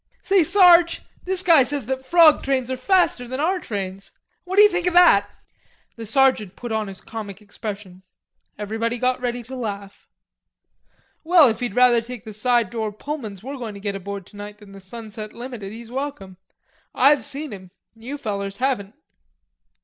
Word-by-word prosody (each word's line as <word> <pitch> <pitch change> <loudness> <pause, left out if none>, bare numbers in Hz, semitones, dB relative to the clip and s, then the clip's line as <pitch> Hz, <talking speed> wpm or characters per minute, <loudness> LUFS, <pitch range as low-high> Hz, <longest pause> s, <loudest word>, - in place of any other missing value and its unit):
"Say, 385 -2 +3
Sarge, 345 0 +5 0.2
this 375 0 0
guy 330 -5 +6
says 275 0 -2
that 265 +2 -3
frog 325 +1 +5
trains 260 -2 -1
are - - -1
faster 255 -3 +1
than 260 +2 -5
our 360 +5 +1
trains. 195 - -6 0.4
What 370 +1 -4
d'ye 420 +1 +8
think 360 -3 -2
o' - - +2
that?" 205 - +6 0.7
The 230 -2 -8
sergeant 235 -5 +2
put 240 -1 -7
on 220 -1 -1
his 195 -1 -8
comic 210 -3 -8
expression. 205 -3 -8 0.6
Everybody 225 +3 -3
got 250 +1 0
ready 245 -1 -3
to 260 +3 -9
laugh. 200 -5 -7 1.2
"Well, 330 -4 +6
if 220 - -3
he'd 245 -1 -4
rather 245 -2 +5
take 240 -1 -9
the 215 - -8
side 235 -1 +1
door 220 -2 -3
Pullmans 215 -4 -7
we're 275 +2 -6
going 225 -5 -6
to - - -9
get 200 0 -3
aboard 195 0 -6
tonight 205 +1 -10
than 205 -2 -16
the 195 - -12
'Sunset 215 +1 -9
Limited,' 235 -5 -8
he's 230 +1 -11
welcome. 255 -9 -6 0.6
I've 280 +2 +4
seen 285 -1 -5
'em. 190 -2 -11 0.2
You 235 +6 -8
fellers 200 -5 -4
haven't." 245 -6 -2
235 Hz, 170 wpm, -22 LUFS, 205-275 Hz, 1.2 s, d'ye